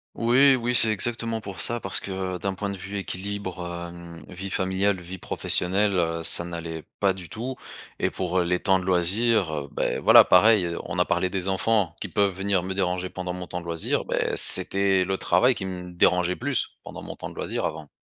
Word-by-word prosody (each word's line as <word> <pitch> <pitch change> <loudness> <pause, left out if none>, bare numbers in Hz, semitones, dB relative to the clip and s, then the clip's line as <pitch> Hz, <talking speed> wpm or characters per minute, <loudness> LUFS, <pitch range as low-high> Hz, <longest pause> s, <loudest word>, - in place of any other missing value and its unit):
Oui 130 +4 +3
oui, 120 -1 -3
c'est 115 -2 +7
exactement 115 +1 -1
pour 100 -3 -7
ça. 120 0 +3
Parce 95 -4 -3
que 95 -1 -6
d'un 95 +2 -4
point 100 +1 -5
de 100 - -7
vue 100 +2 -8
équilibre 95 -1 -6 0.3
hem, 85 -1 -13
vie 95 +1 -8
familiale, 95 +1 -1
vie 90 +2 -10
professionnelle, 100 +5 +2
heu, 85 -1 -2
ça 85 - +6
n'allait 85 -2 -7 0.2
pas 100 -1 +1
du 90 -3 -12
tout. 125 +4 -5 0.4
Et - - 0
pour, 90 0 -3
heu, - - +1
les 90 +1 -1
temps 95 -1 +1
de 90 - -8
loisirs, 95 +1 +1
heu, 75 -2 -5
beh, - - -3
voilà - - +6
pareil, 90 -3 +3
on - - -7
a - - +2
parlé 95 - -1
des 95 0 -4
enfants 95 -2 0
qui - - -4
peuvent 100 -1 0
venir 95 -1 -1
me 95 +1 -4
déranger 90 -1 -2
pendant 90 -1 -6
mon 90 0 -7
temps 90 0 -7
de - - -14
loisir, 85 -1 -2
beh, - - -1
c'était 95 -1 +7
le 95 +1 -3
travail 125 +1 +2
qui 100 - -7
me 90 -1 -8
dérangeait 90 0 +1
plus 130 0 -4
pendant - - -10
mon - - -8
temps - - -8
de - - -15
loisir - - -4
avant. 75 -2 -6
95 Hz, 215 wpm, -23 LUFS, 90-100 Hz, 0.4 s, c'est